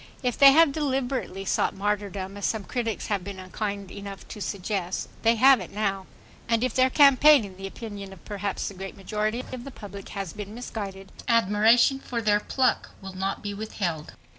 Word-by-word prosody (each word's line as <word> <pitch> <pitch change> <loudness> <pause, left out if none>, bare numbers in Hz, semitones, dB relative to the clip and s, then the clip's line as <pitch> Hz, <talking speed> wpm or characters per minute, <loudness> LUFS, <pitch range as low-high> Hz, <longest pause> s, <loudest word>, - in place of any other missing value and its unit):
If 245 -2 0
they 275 -1 +9
have 325 -1 +6
deliberately 265 -8 -2
sought - - +1
martyrdom, 200 -1 -2
as 205 - -1
some 220 -2 -2
critics 230 0 -3
have 205 -4 -1
been 195 0 -7
unkind 200 +1 -5
enough 200 -1 -8
to 210 - -8
suggest, 195 -2 -3
they 230 +1 +4
have 260 +2 +6
it 185 - -7
now. 195 -2 -2 0.4
And 230 0 +2
if 255 -3 0
their 260 0 +4
campaign, 280 -1 +6
in 190 -2 -11
the 195 +1 -6
opinion 200 -2 -8
of 190 - -14
perhaps 205 -1 -3
the - - -5
great 195 +1 -8
majority 215 +4 -2
of 250 -2 -6
the 275 - -7
public, 200 -6 -10
has 195 -4 -4
been 210 0 -7
misguided, 200 -5 -6 0.2
admiration 230 +3 +4
for 245 -3 -4
their 210 -2 +3
pluck 255 +4 0
will 190 -1 -9
not 190 +1 -3
be 205 -1 -3
withheld. 185 -7 -4
210 Hz, 190 wpm, -26 LUFS, 195-240 Hz, 0.4 s, they